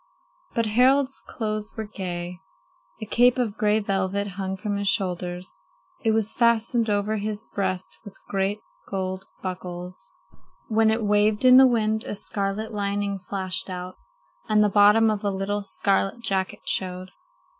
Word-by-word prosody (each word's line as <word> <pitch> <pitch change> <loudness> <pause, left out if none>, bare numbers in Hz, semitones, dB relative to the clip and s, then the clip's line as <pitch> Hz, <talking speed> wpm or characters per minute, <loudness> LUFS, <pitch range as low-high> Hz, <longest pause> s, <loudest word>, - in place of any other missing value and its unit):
But 230 -2 +2
Harald's 260 +5 +3
clothes 215 -1 -4
were 220 - -2
gay. 180 -4 -5 0.6
A - - -4
cape 245 +4 +4
of 230 -5 -1
gray 215 -1 +2
velvet 200 0 -1
hung 190 0 -4
from 205 0 -3
his 200 0 -2
shoulders. 180 -2 -2 0.4
It 225 - +2
was 220 -1 +1
fastened 235 0 +2
over 205 +1 0
his 215 +1 -3
breast 185 -2 -2
with 205 -3 -11
great 195 +2 -1 0.3
gold 190 -1 -3 0.2
buckles. 180 -1 -6 0.5
When 220 0 +3
it 220 +1 +1
waved 210 +2 +2
in 255 0 +9
the 265 0 +9
wind, 220 -2 +1
a - - -4
scarlet 205 +2 -2
lining 200 -1 -1
flashed 185 0 -2
out, 180 0 -6 0.5
and 210 0 +4
the 210 - +3
bottom 210 +2 +5
of 210 -1 -3
a 205 - +1
little 200 +1 -2
scarlet 195 +2 0
jacket 190 -4 -2
showed. 185 0 -2
205 Hz, 150 wpm, -25 LUFS, 190-220 Hz, 0.6 s, in